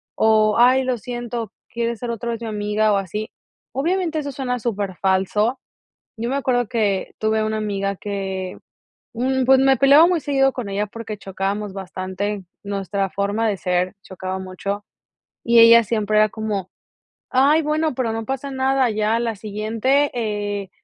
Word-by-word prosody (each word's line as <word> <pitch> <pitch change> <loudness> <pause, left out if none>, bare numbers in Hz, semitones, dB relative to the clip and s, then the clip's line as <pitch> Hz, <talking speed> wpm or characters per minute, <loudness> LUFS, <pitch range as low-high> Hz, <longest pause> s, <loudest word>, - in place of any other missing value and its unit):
o, 215 -1 +3
"ay, 255 +2 +5
lo 255 -1 0
siento, 240 -1 -5 0.2
¿quieres 235 -1 -2
ser 245 - -4
otra 235 +1 -3
vez 230 - -5
mi 230 - -4
amiga?", 210 0 0
o 200 - +3
así, 210 +3 -4 0.4
obviamente, 330 +3 0
eso 285 -2 -5
suena 250 -2 -2
súper 200 -5 -3
falso, 195 +5 +1 0.6
yo 230 +1 -2
me 270 - -1
acuerdo 245 -4 0
que 205 -5 -1
tuve 220 0 +1
una 215 0 -1
amiga 200 -2 -2
que, 190 -2 -4 0.6
mm, 260 +2 0
pues, 265 +1 +6
me 270 0 +4
peleaba 280 +4 +7
muy 355 -2 +1
seguido 270 -1 +2
con 245 -5 -5
ella 200 +1 -1
porque 220 0 -7
chocábamos 195 +1 -3
bastante 190 +1 -4 0.2
nuestra 200 -1 -2
forma 205 +4 0
de 205 - 0
ser, 180 +1 -1
chocaba 190 0 -5
mucho, 195 +2 -5 0.6
y 235 0 +5
ella 230 0 +8
siempre 215 -1 0
era 215 0 +5
como: 210 -4 -4 0.6
"ay 280 +5 +4
bueno, 305 0 0
pero 235 -3 -1
no 225 0 -3
pasa 270 +3 -4
nada", 265 -1 +2
ya 215 +1 +1
a - - 0
la 230 -2 -2
siguiente, 220 +7 0
eh, 205 -4 -3
220 Hz, 165 wpm, -21 LUFS, 200-250 Hz, 0.6 s, ella